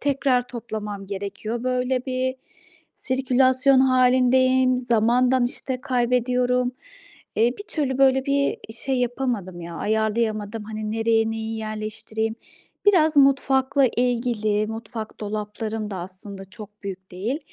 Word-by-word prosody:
tekrar 275 Hz, -3 st, +2 dB
toplamam 210 Hz, -4 st, -6 dB
gerekiyor. 205 Hz, +4 st, -4 dB
Böyle 255 Hz, 0 st, 0 dB
bir 260 Hz, 0 st, -1 dB, 0.6 s
sirkülasyon 260 Hz, 0 st, +3 dB
hâlindeyim, 255 Hz, 0 st, +4 dB
zamandan, 245 Hz, +1 st, +3 dB
işte, 255 Hz, +1 st, -4 dB
kaybediyorum. 250 Hz, -1 st, +1 dB, 0.6 s
Eee, 235 Hz, +3 st, +3 dB
bir -, -, -5 dB
türlü 270 Hz, -4 st, -2 dB
böyle 265 Hz, 0 st, +4 dB
bir 280 Hz, 0 st, +1 dB, 0.3 s
şey 265 Hz, -2 st, 0 dB
yapamadım 240 Hz, -8 st, -2 dB
ya, 170 Hz, 0 st, -7 dB
ayarlayamadım. 220 Hz, 0 st, -1 dB
Hani, 215 Hz, 0 st, -4 dB
nereye 225 Hz, 0 st, +2 dB
neyi 225 Hz, 0 st, -4 dB
yerleştireyim? 215 Hz, +1 st, -4 dB, 0.5 s
Biraz 320 Hz, -6 st, +4 dB
mutfakla 275 Hz, 0 st, +4 dB
ilgili. 230 Hz, -4 st, 0 dB
Mutfak 220 Hz, 0 st, -7 dB
dolaplarım 215 Hz, +1 st, -4 dB
da 195 Hz, -, -4 dB
aslında 190 Hz, +2 st, -9 dB
çok 210 Hz, +1 st, -12 dB
büyük 190 Hz, -1 st, -7 dB
değil. 210 Hz, +10 st, -3 dB
240 Hz, 115 wpm, -23 LUFS, 215-260 Hz, 0.6 s, hâlindeyim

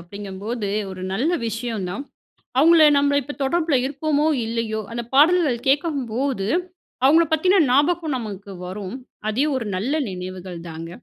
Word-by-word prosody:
அப்படிங்கும்போது 200 Hz, +4 st, -5 dB, 0.2 s
ஒரு 185 Hz, -1 st, -8 dB
நல்ல 260 Hz, -, +1 dB, 0.2 s
விஷயம் 225 Hz, -3 st, -3 dB
தான். 275 Hz, +10 st, -5 dB, 0.6 s
அவங்கள 315 Hz, +1 st, +7 dB
நம்மள 285 Hz, 0 st, +3 dB
இப்போ 290 Hz, +3 st, -7 dB
தொடர்பில 315 Hz, +2 st, +1 dB
இருப்போமோ 295 Hz, +2 st, 0 dB, 0.2 s
இல்லையோ, 225 Hz, -1 st, -2 dB
அந்த 235 Hz, 0 st, -3 dB
பாடல்கள் 295 Hz, -5 st, +4 dB
கேட்கும்போது 270 Hz, -, 0 dB, 0.6 s
அவங்களை 320 Hz, +5 st, +6 dB
பத்தின 370 Hz, +5 st, +4 dB
ஞாபகம் 305 Hz, +3 st, +2 dB
நமக்கு 200 Hz, -4 st, -7 dB
வரும். 190 Hz, +3 st, -6 dB, 0.3 s
அதே 245 Hz, +7 st, +1 dB
ஒரு 240 Hz, -4 st, -2 dB
நல்ல 220 Hz, +10 st, -1 dB, 0.2 s
நினைவுகள் 185 Hz, -1 st, -7 dB
தாங்க. 165 Hz, +1 st, -7 dB
245 Hz, 130 wpm, -22 LUFS, 200-295 Hz, 0.6 s, அவங்கள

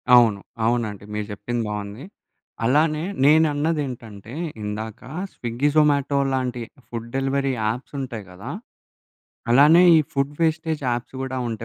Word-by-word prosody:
అవును. 115 Hz, -5 st, +5 dB, 0.3 s
అవునండి. 110 Hz, -4 st, -1 dB
మీరు 105 Hz, 0 st, -2 dB
జెప్పింది 115 Hz, +3 st, -3 dB
బావుంది. 105 Hz, +3 st, -5 dB, 0.6 s
అలానే 150 Hz, +4 st, +2 dB, 0.2 s
నేనన్నది 155 Hz, +1 st, +4 dB
ఏంటంటే, 115 Hz, -3 st, -9 dB, 0.3 s
ఇందాక 110 Hz, +2 st, -5 dB, 0.3 s
స్విగ్గీ, 120 Hz, +4 st, -1 dB
జొమాటో 145 Hz, -2 st, +3 dB, 0.2 s
లాంటి 125 Hz, -2 st, -1 dB, 0.3 s
ఫుడ్ 115 Hz, -1 st, -6 dB
డెలివరీ 135 Hz, 0 st, 0 dB, 0.2 s
యాప్సుంటాయి 125 Hz, 0 st, -4 dB
కదా! 100 Hz, +7 st, -9 dB, 1.0 s
అలానే 150 Hz, +8 st, +7 dB
ఈ -, -, +7 dB
ఫుడ్ 140 Hz, +1 st, 0 dB
వేస్టేజ్ 160 Hz, -1 st, 0 dB
యాప్స్ 120 Hz, +2 st, -3 dB
కూడా 130 Hz, 0 st, -4 dB
ఉంటే 115 Hz, 0 st, -5 dB
125 Hz, 120 wpm, -23 LUFS, 115-145 Hz, 1.0 s, అలానే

